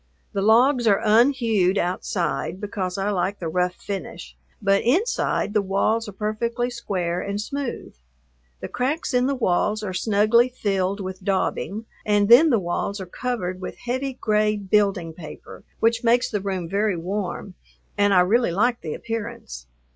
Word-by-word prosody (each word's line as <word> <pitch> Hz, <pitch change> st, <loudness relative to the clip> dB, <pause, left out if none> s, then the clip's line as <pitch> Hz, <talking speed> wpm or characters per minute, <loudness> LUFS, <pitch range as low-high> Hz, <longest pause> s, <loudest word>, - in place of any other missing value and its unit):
The 200 Hz, -, -1 dB
logs 240 Hz, +4 st, +4 dB
are 200 Hz, -2 st, +4 dB
unhewed 220 Hz, -4 st, +3 dB
outside 175 Hz, -1 st, -2 dB
because 195 Hz, -3 st, -4 dB
I 195 Hz, +1 st, 0 dB
like 195 Hz, +1 st, -1 dB
the 170 Hz, -, -5 dB
rough 180 Hz, +2 st, 0 dB
finish, 155 Hz, -, -7 dB, 0.2 s
but 195 Hz, 0 st, +2 dB
inside 360 Hz, -, 0 dB
the 210 Hz, -, +3 dB
walls 205 Hz, +3 st, 0 dB
are -, -, -7 dB
perfectly 230 Hz, +4 st, -2 dB
square 180 Hz, -7 st, -2 dB
and 200 Hz, +1 st, -3 dB
smooth. 275 Hz, +3 st, -5 dB, 0.7 s
The -, -, -4 dB
cracks 275 Hz, +5 st, -2 dB
in 250 Hz, +1 st, +3 dB
the 280 Hz, -, 0 dB
walls 215 Hz, -1 st, 0 dB
are 190 Hz, -3 st, -3 dB
snugly 215 Hz, +5 st, +3 dB
filled 200 Hz, -4 st, -1 dB
with 185 Hz, 0 st, -7 dB
"daubing" 200 Hz, +2 st, -1 dB, 0.2 s
and 205 Hz, -1 st, +2 dB
then 290 Hz, +8 st, +8 dB
the 240 Hz, -, +4 dB
walls 195 Hz, +2 st, -2 dB
are 190 Hz, -, -5 dB
covered 185 Hz, -3 st, -4 dB
with 185 Hz, -, -6 dB
heavy 260 Hz, +3 st, -3 dB
gray 215 Hz, -3 st, +1 dB
building 195 Hz, -4 st, +1 dB
paper, 155 Hz, -2 st, -11 dB, 0.2 s
which 230 Hz, +1 st, +2 dB
makes 240 Hz, +1 st, +3 dB
the 205 Hz, -, -1 dB
room 190 Hz, -3 st, -3 dB
very 200 Hz, +1 st, 0 dB
warm, 190 Hz, +2 st, -4 dB, 0.4 s
and 205 Hz, -1 st, +3 dB
I 185 Hz, -2 st, +6 dB
really 220 Hz, +3 st, +2 dB
like 235 Hz, +7 st, +1 dB
the 155 Hz, -, -4 dB
appearance. 205 Hz, -, -6 dB
205 Hz, 160 wpm, -23 LUFS, 185-235 Hz, 0.7 s, then